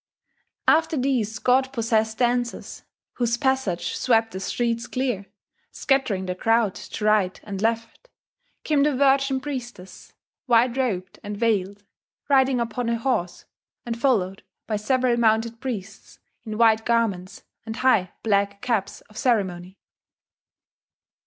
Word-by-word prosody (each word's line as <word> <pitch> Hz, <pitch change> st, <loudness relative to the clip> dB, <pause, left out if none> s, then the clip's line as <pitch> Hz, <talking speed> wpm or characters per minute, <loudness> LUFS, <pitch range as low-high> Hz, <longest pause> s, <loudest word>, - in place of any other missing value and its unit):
After 320 Hz, 0 st, +3 dB
these 250 Hz, -5 st, 0 dB
god 260 Hz, +4 st, +2 dB
possessed 220 Hz, -3 st, 0 dB
dancers 245 Hz, -1 st, -1 dB, 0.4 s
whose 235 Hz, -1 st, +1 dB
passage 265 Hz, -9 st, -1 dB
swept 225 Hz, -2 st, +2 dB
the 190 Hz, -, -6 dB
streets 230 Hz, +4 st, -2 dB
clear, 245 Hz, -7 st, -2 dB, 0.4 s
scattering 235 Hz, -9 st, 0 dB
the 180 Hz, -, -2 dB
crowd 225 Hz, +1 st, +2 dB
to 210 Hz, -, -6 dB
right 210 Hz, -4 st, +2 dB
and 200 Hz, -2 st, -6 dB
left 230 Hz, -, -2 dB, 0.5 s
came 300 Hz, -2 st, +2 dB
the 290 Hz, -1 st, +2 dB
virgin 270 Hz, 0 st, +3 dB
priestess, 240 Hz, -9 st, -8 dB, 0.4 s
white 240 Hz, 0 st, +4 dB
robed 195 Hz, -9 st, -2 dB
and 205 Hz, 0 st, -5 dB
veiled, 205 Hz, -3 st, 0 dB, 0.5 s
riding 265 Hz, -2 st, +4 dB
upon 235 Hz, 0 st, -2 dB
a 235 Hz, -, +1 dB
horse, 225 Hz, -8 st, -2 dB, 0.4 s
and 235 Hz, -1 st, -3 dB
followed 195 Hz, -8 st, +1 dB, 0.2 s
by 215 Hz, -, -2 dB
several 245 Hz, +3 st, +1 dB
mounted 225 Hz, 0 st, +1 dB
priests 220 Hz, -6 st, -6 dB, 0.3 s
in 215 Hz, -1 st, -5 dB
white 225 Hz, -1 st, +4 dB
garments 220 Hz, -6 st, -1 dB, 0.2 s
and 220 Hz, 0 st, -6 dB
high 225 Hz, -8 st, +3 dB
black 200 Hz, -2 st, +1 dB
caps 230 Hz, -6 st, -1 dB
of 215 Hz, -, -12 dB
ceremony. 190 Hz, -7 st, -1 dB
230 Hz, 125 wpm, -24 LUFS, 205-255 Hz, 0.5 s, white